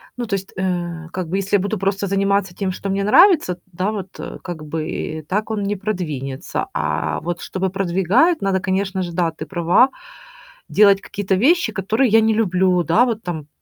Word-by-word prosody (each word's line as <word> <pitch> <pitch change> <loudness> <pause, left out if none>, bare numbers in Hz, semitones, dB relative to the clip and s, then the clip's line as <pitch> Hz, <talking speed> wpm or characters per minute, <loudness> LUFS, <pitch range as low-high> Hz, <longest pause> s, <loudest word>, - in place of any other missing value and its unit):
ну 240 -2 -4
то 200 - 0
есть, 195 0 -6
э, 175 -3 -2
как 185 -3 -4
бы, 190 +4 -1
если 195 +1 0
я - - +4
буду 200 +1 -2
просто 195 0 0
заниматься 195 -1 +1
тем, 190 -1 -2
что 195 +2 -5
мне 195 +1 0
нравится 305 - +5
т 175 - -30
да, 185 +5 -1
вот, 195 -3 -5
а, - - -6
как 170 -4 -6
бы 155 +1 -4
и 155 0 -4
так 210 +7 -2
он 210 -2 -2
не 205 +1 -1
продвинется, 155 -10 -4
а, - - -1
вот 175 0 -4
чтобы 190 -1 -3
продвигают, 195 - +2
надо, 190 -1 +1
конечно 190 0 -1
же, 175 - -4
да, 170 -1 +1
ты 160 - -8
права. 175 +8 +3 0.8
Делать 200 -1 +5
какие-то 195 -1 -2
вещи, 270 - +3
которые 215 +6 +1
я 225 +1 +5
не 220 0 +3
люблю, 185 -4 +2
да, 170 +10 +4
вот 230 -2 -3
там, 160 -5 -5
195 Hz, 205 wpm, -20 LUFS, 175-205 Hz, 0.8 s, нравится